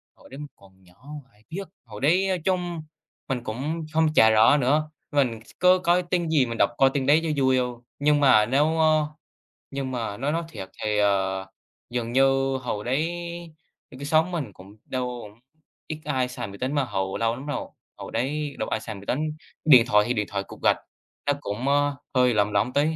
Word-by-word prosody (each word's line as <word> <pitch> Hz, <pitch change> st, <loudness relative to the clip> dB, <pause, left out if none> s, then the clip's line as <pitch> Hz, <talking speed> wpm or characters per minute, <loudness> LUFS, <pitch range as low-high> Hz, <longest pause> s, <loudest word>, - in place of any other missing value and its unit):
Hồi -, -, -18 dB
đấy 135 Hz, -, -10 dB
mình 150 Hz, -, -6 dB
còn 95 Hz, -1 st, -21 dB
nhỏ 90 Hz, 0 st, -21 dB, 0.4 s
ai 105 Hz, +1 st, -27 dB
biết, 190 Hz, +3 st, -5 dB, 0.2 s
hồi 105 Hz, -3 st, -10 dB
đấy 180 Hz, +7 st, +3 dB
nói 185 Hz, -1 st, 0 dB
chung 175 Hz, -3 st, -1 dB, 0.5 s
mình 130 Hz, -3 st, -2 dB
cũng 150 Hz, +9 st, -4 dB
không 160 Hz, 0 st, +2 dB
chả 110 Hz, -7 st, +7 dB
rõ 110 Hz, +5 st, +6 dB
nữa. 150 Hz, +3 st, +1 dB, 0.2 s
Mình 125 Hz, -6 st, +1 dB, 0.2 s
có 180 Hz, 0 st, +5 dB
coi 180 Hz, 0 st, +2 dB
tin 175 Hz, -1 st, -1 dB
gì 150 Hz, -5 st, +3 dB
mình 115 Hz, -1 st, -5 dB
đọc -, -, +4 dB
coi 135 Hz, 0 st, +5 dB
tin 135 Hz, -2 st, 0 dB
đấy 150 Hz, +3 st, +5 dB
cho 150 Hz, -4 st, 0 dB
vui 130 Hz, 0 st, +4 dB
thôi. 125 Hz, -1 st, -2 dB, 0.2 s
Nhưng 145 Hz, 0 st, +3 dB
mà 120 Hz, -7 st, +5 dB
nếu 135 Hz, +4 st, +3 dB
ơ, 155 Hz, -1 st, +3 dB, 0.7 s
nhưng 135 Hz, -1 st, -3 dB
mà 115 Hz, -5 st, -3 dB
nói 140 Hz, +6 st, -1 dB
nói 165 Hz, +2 st, -1 dB
thiệt 95 Hz, -12 st, -8 dB
thì, 105 Hz, -1 st, 0 dB
ờ, 95 Hz, -2 st, +1 dB, 0.4 s
dường 120 Hz, -1 st, -3 dB
như 135 Hz, 0 st, +3 dB
hồi 120 Hz, -5 st, -4 dB
đấy 135 Hz, +6 st, +1 dB, 0.9 s
cái 140 Hz, -, -7 dB
xóm 160 Hz, +4 st, +2 dB
mình 145 Hz, -, -4 dB
cũng 95 Hz, +3 st, -15 dB
đâu 125 Hz, -1 st, -3 dB
cũng 105 Hz, +1 st, -13 dB, 0.5 s
ít 155 Hz, -, -5 dB
ai 130 Hz, -4 st, 0 dB
xài 125 Hz, -, -6 dB
máy 100 Hz, 0 st, -10 dB
tính 130 Hz, +5 st, -2 dB
mà 145 Hz, -2 st, +2 dB
hồi 95 Hz, -5 st, -3 dB
lâu 115 Hz, 0 st, +1 dB
lắm 130 Hz, +3 st, -9 dB
rồi, 145 Hz, -, -3 dB, 0.3 s
hồi -, -, -8 dB
đấy 140 Hz, +4 st, -2 dB
đâu 110 Hz, -, -2 dB
có -, -, -20 dB
ai -, -, -3 dB
xài 110 Hz, -1 st, -6 dB
máy 100 Hz, 0 st, -11 dB
tính. 130 Hz, -, 0 dB, 0.5 s
Điện 130 Hz, -7 st, +8 dB
thoại 105 Hz, -3 st, +4 dB
thì 120 Hz, -, +1 dB
điện 105 Hz, -3 st, -1 dB
thoại 100 Hz, -1 st, -2 dB
cục -, -, -13 dB
gạch -, -, +4 dB, 0.5 s
nó 145 Hz, -, +2 dB
cũng, 105 Hz, +3 st, -4 dB
ơ, 145 Hz, 0 st, +2 dB, 0.2 s
hơi 125 Hz, -1 st, +4 dB
lỏng 105 Hz, -1 st, +2 dB
lỏng 105 Hz, +5 st, +1 dB
tí, 145 Hz, -, +3 dB
130 Hz, 215 wpm, -25 LUFS, 110-150 Hz, 0.9 s, Điện